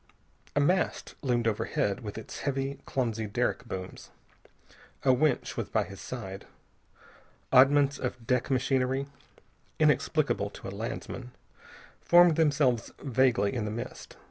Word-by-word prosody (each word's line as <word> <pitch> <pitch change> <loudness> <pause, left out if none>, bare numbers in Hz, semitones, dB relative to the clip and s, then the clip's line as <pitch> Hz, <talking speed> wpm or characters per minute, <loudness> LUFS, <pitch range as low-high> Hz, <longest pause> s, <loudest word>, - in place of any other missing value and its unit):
A - - +3
mast 175 +6 +1
loomed 120 -4 +1
overhead, 100 -2 0
with 105 -4 -7
its 110 - -8
heavy, 135 0 -2
clumsy 115 -4 -1
derrick 120 +3 -1
booms. 95 -4 -7 0.9
A 130 -2 +5
winch 150 +4 +1
was - - -3
by - - +1
his 100 -1 -10
side. 100 -6 -7 1.0
Oddments 140 +2 +5
of 125 -2 -4
deck 125 +1 +1
machinery, 130 0 +1 0.7
inexplicable - - +2
to - - -10
a - - -5
landsman, 125 0 -6 0.7
formed 175 -1 +6
themselves 145 -8 +2
vaguely 130 -5 +2
in 115 -4 -2
the - - -2
mist. 120 +4 -7
125 Hz, 125 wpm, -29 LUFS, 115-140 Hz, 1.0 s, formed